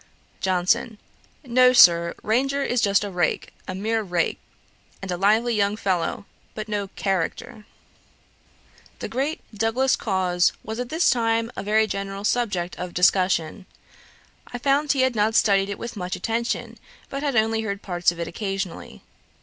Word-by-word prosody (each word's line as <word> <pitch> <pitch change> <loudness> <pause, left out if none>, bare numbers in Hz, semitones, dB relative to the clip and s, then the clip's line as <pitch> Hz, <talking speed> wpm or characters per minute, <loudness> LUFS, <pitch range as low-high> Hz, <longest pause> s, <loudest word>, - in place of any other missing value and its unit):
JOHNSON. 190 +5 0 0.5
'No, 250 0 +4
Sir; 170 -7 +6
Ranger 270 +6 +1
is 245 -3 0
just 200 -2 +3
a 205 - -5
rake, 175 -1 -1
a 185 - -4
mere 220 +3 -1
rake, 175 -4 -1 0.6
and 195 -1 -6
a - - 0
lively 215 +6 +2
young 205 -1 +1
fellow, 190 -2 -1 0.3
but 215 0 -5
no 205 -2 -2
character'. 195 +2 -3 1.3
The - - -5
great 275 +6 -2
Douglas 225 +5 +1
Cause 185 -4 +1
was 220 +2 -6
at 245 -1 -4
this 320 +5 +3
time 230 -1 0
a - - -4
very 215 +2 +2
general 195 -1 -5
subject 200 -7 -1
of 180 -1 -6
discussion. 185 0 +2 0.8
I 245 - -6
found 280 +3 +1
he 270 - +1
had 260 -2 +2
not 215 +1 +1
studied 200 -4 +3
it 200 - -4
with 235 - -7
much 180 -2 -4
attention, 230 0 -3 0.3
but 275 - -4
had 285 -3 -1
only 220 0 +2
heard 200 -2 -4
parts 175 -2 +1
of 170 - -11
it 170 - -3
occasionally. 195 - -5
210 Hz, 160 wpm, -23 LUFS, 185-235 Hz, 1.3 s, Sir